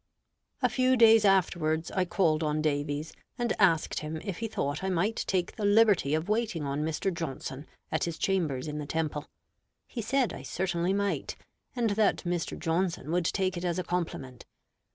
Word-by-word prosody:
A - - +6
few 255 0 +2
days 225 -2 +7
afterwards 170 -4 +2
I 185 -1 +1
called 170 -3 +2
on 155 -1 0
Davies, 145 0 -1 0.2
and 240 -2 0
asked 170 -6 +3
him 155 +1 -5
if 195 -4 -4
he 225 - -2
thought 145 -5 -3
I 190 - 0
might 190 +5 0
take 185 -2 0
the 215 - -5
liberty 205 -8 +4
of 160 +3 -2
waiting 210 -7 0
on 140 +1 -2
Mr. 160 +4 -1
Johnson 145 -3 -5 0.2
at 160 - 0
his 170 -1 -4
chambers 160 -8 0
in 150 0 -4
the 145 - -5
Temple. 150 -1 -2 0.6
He 235 - -5
said 255 +3 +1
I - - -7
certainly 180 -1 -1
might, 200 0 -1 0.4
and 235 -3 +1
that 205 0 +2
Mr. 175 -1 -2
Johnson 165 -2 -1
would 175 0 +1
take 185 +1 0
it 175 - -4
as 175 -1 -1
a 185 - -1
compliment. 140 -9 -4
175 Hz, 180 wpm, -29 LUFS, 155-200 Hz, 0.6 s, days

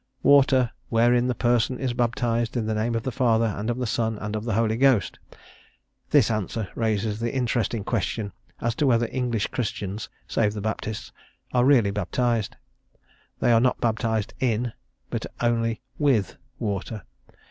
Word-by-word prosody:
Water; 135 -3 +5 0.2
wherein 120 +1 +3
the 125 - 0
person 120 +1 +1
is 130 -3 -2
baptized 120 -1 0
in 115 - -1
the 110 - -1
name 110 +2 0
of 115 - -1
the 130 - -2
Father, 115 -2 +2
and 105 0 -2
of 120 - -1
the 125 - -1
Son, 110 -1 -1
and 110 0 -4
of 110 +1 -4
the 115 -4 -1
Holy 110 0 +2
Ghost." 130 -6 +3 0.9
This 135 -7 +4
answer 110 -1 -2
raises 110 -1 -1
the 115 0 -1
interesting 120 -4 -1
question 105 0 -2 0.3
as 120 0 0
to 145 +4 +1
whether 120 -2 +3
English 120 -4 0
Christians 105 -3 -4 0.2
save 105 -2 +1
the 105 - -4
Baptists 110 0 -4 0.4
are 125 0 +4
really 125 -8 +5
baptized. 115 +1 -1 0.9
They - - +4
are 115 -1 +5
not 125 0 +2
baptized 110 -2 0
"in," 120 -2 0 0.4
but - - -3
only 115 -1 0 0.2
"with" 130 -10 +2 0.2
water. 105 -1 -3
115 Hz, 160 wpm, -25 LUFS, 110-120 Hz, 0.9 s, Water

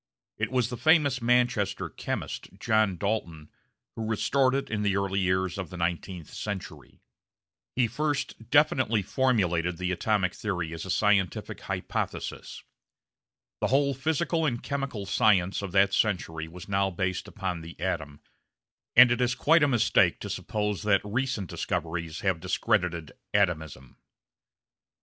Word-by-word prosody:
It - - 0
was 125 -2 +1
the 125 - -5
famous 140 -1 +3
Manchester 120 -4 +1
chemist, - - -5
John 110 -4 +2
Dalton, 85 -6 -3 0.4
who 110 -1 -4
restored 130 +4 +2
it 140 - -1
in 105 -1 -1
the 100 -2 +1
early 100 0 0
years 95 0 0
of 95 -4 -4
the 90 - -8
nineteenth 85 0 -3
century. 100 -3 -7 0.7
He 125 - +3
first 140 -2 -3
definitely 130 -7 +3
formulated 90 -8 +1
the 90 +1 -2
atomic 95 0 +1
theory 90 -6 -3
as 80 +2 -6
a - - -8
scientific 100 -1 +1
hypothesis. - - -4 1.0
The - - +1
whole 140 +1 +2
physical 160 +4 0
and 120 -6 -1
chemical 135 -8 -3
science 95 -2 +2
of 100 -2 -5
that 100 0 +4
century 80 -6 0
was 90 +2 -11
now 100 -1 +1
based 95 0 -2
upon 90 -3 -4
the 80 0 -11
atom, 75 -5 -3 0.7
and 125 0 +9
it 120 - +1
is 125 0 +1
quite 165 +2 +4
a 145 - +5
mistake 120 -5 +3
to - - -5
suppose 105 -2 -2
that 100 -2 +3
recent 120 -2 -2
discoveries 80 0 -3
have 95 -4 +1
discredited 90 -3 0 0.2
"atomism." 80 -9 -1
100 Hz, 140 wpm, -27 LUFS, 90-125 Hz, 1.0 s, and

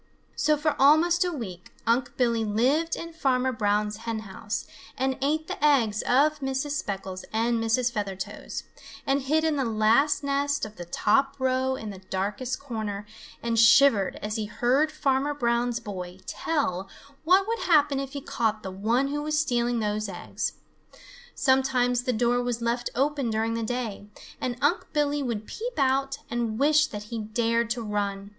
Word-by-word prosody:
So 305 +1 +2
for 300 0 0
almost 325 +6 +5
a 360 - -1
week 190 - -7 0.2
Unc' 240 +2 +1
Billy 235 -3 +2
lived 260 +10 +1
in 335 0 -7
Farmer 260 -4 +1
Brown's 210 -2 0
hen 225 -1 -4
house 205 0 -5 0.3
and 265 0 0
ate 310 +3 +1
the - - -5
eggs 235 -8 +3
of 290 +4 +3
Mrs. 270 +1 -2
Speckles 195 -9 -4
and 230 +1 +1
Mrs. 235 +2 +2
Feathertoes 200 -4 -5 0.4
and 275 +1 +1
hid 310 +4 +1
in 315 -2 +1
the 270 - +1
last 230 +7 +3
nest 280 -1 0
of 215 0 -11
the 175 - -7
top 270 +10 +2
row 260 0 +1
in 220 -4 -6
the 195 - -9
darkest 200 +7 -3
corner 215 -6 -4 0.4
and 230 -1 +1
shivered 230 -3 +6
as 210 +2 -2
he 215 - -2
heard 260 +8 +1
Farmer 285 -1 0
Brown's 240 -2 0
boy 185 -5 -7
tell 195 - -2 0.3
what 375 +5 +4
would 460 +1 -1
happen 295 -5 +3
if 275 -1 -5
he 280 - -4
caught 220 -4 -1
the 190 - -5
one 230 +8 +1
who 295 +1 -2
was 305 0 -1
stealing 240 -4 +1
those 210 0 -1
eggs. 180 - -4 0.8
Sometimes 255 -2 +2
the 255 - +2
door 245 +1 +2
was 245 -1 -2
left 235 +1 -1
open 275 -1 0
during 225 +1 0
the 230 - -2
day, 225 -3 -3 0.3
and 245 -1 -2
Unc' 305 +5 +1
Billy 295 -1 +1
would 230 -5 -3
peep 475 - -6
out 270 0 +1
and 235 -2 -2
wish 300 +3 +4
that 210 -1 -7
he 230 - -2
dared 230 +1 0
to 235 0 -2
run. 200 -2 -3
245 Hz, 170 wpm, -26 LUFS, 215-280 Hz, 0.8 s, shivered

